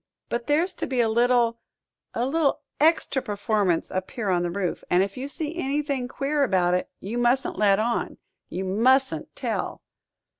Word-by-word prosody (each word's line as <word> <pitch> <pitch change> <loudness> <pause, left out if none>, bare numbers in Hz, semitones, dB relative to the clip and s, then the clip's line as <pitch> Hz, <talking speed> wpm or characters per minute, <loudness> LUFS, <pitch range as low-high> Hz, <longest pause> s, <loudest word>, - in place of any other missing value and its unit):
But 235 0 -3
there's 325 +5 +2
to - - -2
be 260 -2 -1
a 235 - +4
little 235 0 +3 0.6
a 235 - +1
little 290 +1 +1 0.2
extra 310 -3 +3
performance 205 -6 0
up 185 0 -3
here 215 -5 -2
on 175 -1 +2
the 175 - -1
roof, 180 0 -3
and 180 +1 +4
if 195 0 -4
you 260 +2 -4
see 310 +2 -4
anything 280 -4 -1
queer 285 +3 -1
about 185 -7 +2
it, 180 - 0
you 225 +5 -4
mustn't 240 -3 +1
let 200 -2 +5
on 235 +3 -1 0.3
you 190 +2 -3
mustn't 260 +8 +2
tell." - - -3
240 Hz, 175 wpm, -25 LUFS, 195-275 Hz, 0.6 s, let